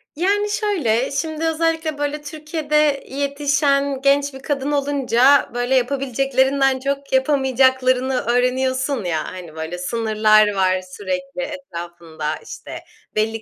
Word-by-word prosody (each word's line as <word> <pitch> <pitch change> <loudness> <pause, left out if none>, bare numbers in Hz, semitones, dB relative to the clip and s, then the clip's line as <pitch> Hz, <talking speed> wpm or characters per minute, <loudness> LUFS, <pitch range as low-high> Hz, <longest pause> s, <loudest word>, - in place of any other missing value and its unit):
Yani, 405 +6 +1
şöyle, 340 - 0
şimdi 315 +3 -2
özellikle, 320 -1 0
böyle, 290 +1 -2
Türkiye'de 300 -1 -1
yetişen 280 0 0
genç 280 +1 +2
bir 265 - -9
kadın 280 0 -2
olunca, 280 -2 +3
böyle, 245 +2 0
yapabileceklerinden 270 +1 +1
çok 275 +1 -3
yapamayacaklarını 260 -1 +2
öğreniyorsun 255 +2 0
ya, 165 -3 -1
hani, 175 -4 -10
böyle 160 +2 -5
sınırlar 215 +1 +3
var 185 -1 +1
sürekli 275 +9 -5
etrafında, 170 - -6
işte, - - -9 0.4
belli 220 +1 0
270 Hz, 110 wpm, -20 LUFS, 235-285 Hz, 0.4 s, olunca